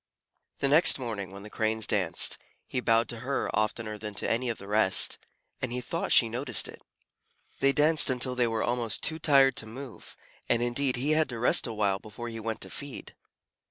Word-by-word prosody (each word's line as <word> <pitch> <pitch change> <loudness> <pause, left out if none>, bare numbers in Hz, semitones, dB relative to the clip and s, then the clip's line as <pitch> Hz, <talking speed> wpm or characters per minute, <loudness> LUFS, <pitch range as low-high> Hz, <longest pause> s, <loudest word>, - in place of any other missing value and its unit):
The 140 - +2
next 150 +5 +5
morning, 110 -7 -5
when 100 +1 -11
the 105 - -10
Cranes 110 -1 0
danced, 90 -5 +1 0.3
he - - -3
bowed 115 -2 +2
to 120 - -5
her 135 +3 -2
oftener 110 0 -2
than 105 -1 -7
to - - -1
any 120 +2 -1
of 115 - -3
the 100 - -11
rest, 105 -2 +3 0.4
and 130 - -3
he 125 - -2
thought 125 - -4
she 115 - +6
noticed 120 0 +1
it. - - -11 0.8
They 135 - +4
danced 150 +2 +4
until 125 0 -1
they 125 -1 +1
were 115 -1 -2
almost 120 -3 -1
too 160 0 0
tired 135 -4 +4
to 110 - -1
move, 125 +2 -11 0.3
and 120 0 +2
indeed 125 +2 0
he 135 +5 -1
had 155 0 +2
to 120 - -5
rest 120 - +3
for - - -3
a - - -5
while 100 -2 0
before 110 +3 -8
he 115 -1 -7
went 110 0 -5
to - - -6
feed. 140 -2 -8
120 Hz, 210 wpm, -28 LUFS, 110-130 Hz, 0.8 s, she